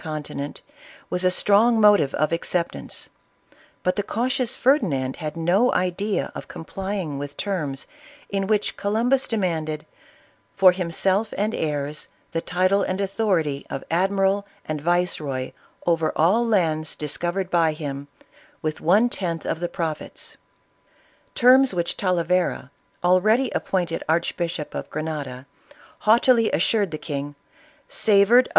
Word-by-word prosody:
conti 155 -3 -5
nent, 140 +1 -6 0.5
was 180 0 -1
a 185 - +5
strong 215 +5 +4
motive 205 -10 +5
of 155 +1 +1
acceptance; 170 +1 -3 0.8
but 185 - +1
the - - +2
cau 225 +4 -1
tious 255 -2 -1
Ferdinand 165 - +1
had 155 0 -5
no 180 +9 +3
idea 185 +3 -1
of - - -8
complying 190 -4 -5
with 145 0 -7
terms 155 -9 -3 0.4
in 195 -1 -2
which 210 -1 0
Columbus 235 +6 +1
demanded 160 -8 -2 0.4
" - - -35
for 190 -2 +8
himself 185 +4 -1
and 210 +3 0
heirs, 150 -1 -3 0.2
the 165 - -1
title 185 +3 +2
and 185 0 -1
authority 190 -8 0
of - - -5
Admiral 195 +3 +1 0.2
and 155 -1 -3
Yiceroy 155 -6 -1 0.3
over 165 -2 +2
all 205 +9 +3
lands 160 -7 +1
discovered 175 +5 -3
by 165 -2 +3
him 145 -2 -6 0.6
with 155 -1 -3
one 205 +8 +4
tenth 175 -8 -3
of - - -2
the 175 0 -2
profits" 165 -4 -5 0.5
— - - -35
terms 260 -3 +6
which 170 -1 -1
Talavera, 180 -6 0 0.3
already 215 +8 +3
appointed 175 -3 -1
Archbishop 170 -1 -1
of - - -5
Grenada, 145 -5 -5 0.5
haughtily 230 +1 +4
assured 200 +3 +2
the 155 - -5
king, 145 -2 -5 0.3
" 310 -2 -31
savored - - -40
of - - -13 0.3
ISABELLA 240 +5 +6
OF - - +5
CASTILE. - - -11
180 Hz, 145 wpm, -23 LUFS, 155-205 Hz, 0.8 s, for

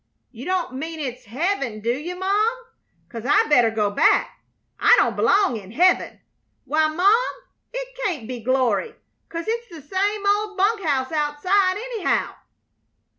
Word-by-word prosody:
"You 245 +3 -10
don't 365 -7 -1
mean 320 +5 -5
it's 255 -3 -5
heav'n, 270 - -2
do 230 +2 0
you, 305 +8 -4
Mom? 405 +5 +1 0.5
'Cause 230 -2 -8
I 270 - +3
better 245 -6 +5
go 210 -2 0
back - - +2 0.4
I - - +6
don't - - +2
belong 395 - +2
in 195 -3 -11
heav'n. 355 - +2 0.5
Why, 310 +3 +2
Mom, 395 +10 +3 0.4
it - - -6
can't 310 - -2
be 250 -1 -5
glory, 255 - 0 0.3
'cause 335 0 -5
it's 470 +1 -2
the 330 -6 -12
same 400 +4 -1
old 410 0 +1
bunk 410 +3 +2
house 270 -4 0
outside, 345 +6 +1
anyhow." 455 -3 -1
330 Hz, 150 wpm, -22 LUFS, 255-405 Hz, 0.5 s, I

